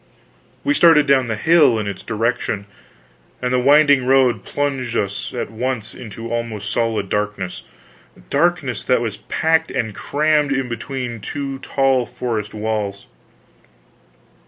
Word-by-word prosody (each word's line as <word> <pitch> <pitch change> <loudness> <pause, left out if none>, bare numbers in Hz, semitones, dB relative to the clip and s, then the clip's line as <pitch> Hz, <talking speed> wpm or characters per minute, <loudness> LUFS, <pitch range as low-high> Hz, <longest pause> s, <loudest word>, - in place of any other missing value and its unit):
We 290 - +2
started 165 - +6
down 135 -3 +3
the 110 - -1
hill 155 -2 +4
in 105 - -2
its 100 -2 -5
direction, 115 -2 -2 0.7
and 125 0 -1
the 125 - +3
winding 140 0 +5
road 130 -5 +3
plunged 135 -4 -2
us - - -2
at - - -4
once 120 -1 -3
into 115 0 -8
almost 110 -3 -3
solid 110 -3 0
darkness 105 -3 -3 0.7
darkness - - +1
that - - +2
was - - -3
packed 160 0 0
and 110 -2 -2
crammed 150 +4 +1
in 135 -1 0
between 120 0 -5
two 135 +5 -5
tall 135 -3 +1
forest 120 -4 -3
walls. 105 -2 -3
120 Hz, 135 wpm, -20 LUFS, 110-135 Hz, 0.7 s, started